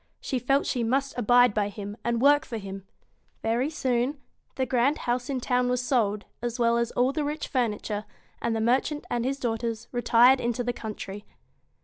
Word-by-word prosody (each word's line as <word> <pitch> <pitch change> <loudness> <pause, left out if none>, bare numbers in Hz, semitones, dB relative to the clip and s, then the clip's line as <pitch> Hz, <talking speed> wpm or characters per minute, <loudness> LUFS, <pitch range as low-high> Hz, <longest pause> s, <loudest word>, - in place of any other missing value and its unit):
She 260 - -2
felt 270 +3 +2
she 245 -3 -1
must 270 +4 0
abide 245 0 +5
by 205 -1 0
him, 205 0 -7
and 235 -1 0
work 290 +3 +5
for 230 - -5
him. 195 -2 -8 0.6
Very 235 +5 +1
soon, 260 -1 -1 0.4
the 260 - 0
grand 255 +4 +2
house 245 +1 -2
in 270 -2 -1
town 250 0 +1
was 250 0 +1
sold, 215 -5 +1 0.2
as 240 0 -3
well 235 -1 +3
as 235 -1 0
all 250 +2 +2
the 300 +1 -2
rich 300 +1 -3
furniture, 215 -4 -2 0.4
and 230 -1 0
the 220 - -1
merchant 260 +6 +1
and 240 -1 0
his 270 +2 -1
daughters 230 -2 -3
retired 245 +1 +5
into 240 +1 -1
the 245 0 -1
country. 205 -3 -7
240 Hz, 190 wpm, -27 LUFS, 225-260 Hz, 0.6 s, abide